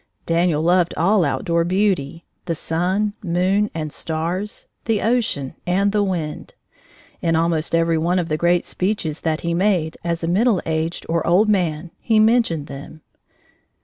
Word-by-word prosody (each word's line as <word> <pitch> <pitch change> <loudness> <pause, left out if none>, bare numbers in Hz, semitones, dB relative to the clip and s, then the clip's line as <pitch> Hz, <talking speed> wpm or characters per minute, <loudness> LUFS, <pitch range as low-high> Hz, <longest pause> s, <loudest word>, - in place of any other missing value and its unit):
Daniel 165 -2 +1
loved 175 0 +2
all 190 +3 +3
outdoor 170 +2 0
beauty, 175 -4 0 0.2
the 165 - -1
sun, 185 +7 -1
moon, 190 +4 +1
and 155 -2 -4
stars, 170 +6 -3 0.2
the 225 -3 +1
ocean, 210 - 0
and 195 +3 +2
the 210 0 +1
wind. 170 -6 -4 0.7
In 165 -1 +1
almost 165 0 +1
every 165 -1 +2
one 175 +3 +1
of 175 -2 0
the 155 - 0
great 175 +2 +2
speeches 180 -5 -2
that 160 -1 -1
he 170 0 -1
made, 175 -3 +1
as 170 -1 -2
a - - 0
middle 205 +3 +3
aged, 160 +1 -2
or 165 0 -1
old 190 +6 +4
man, 170 -4 0
he 225 -2 +1
mentioned 215 -9 +3
them. 145 +3 -10
170 Hz, 155 wpm, -21 LUFS, 160-195 Hz, 0.7 s, old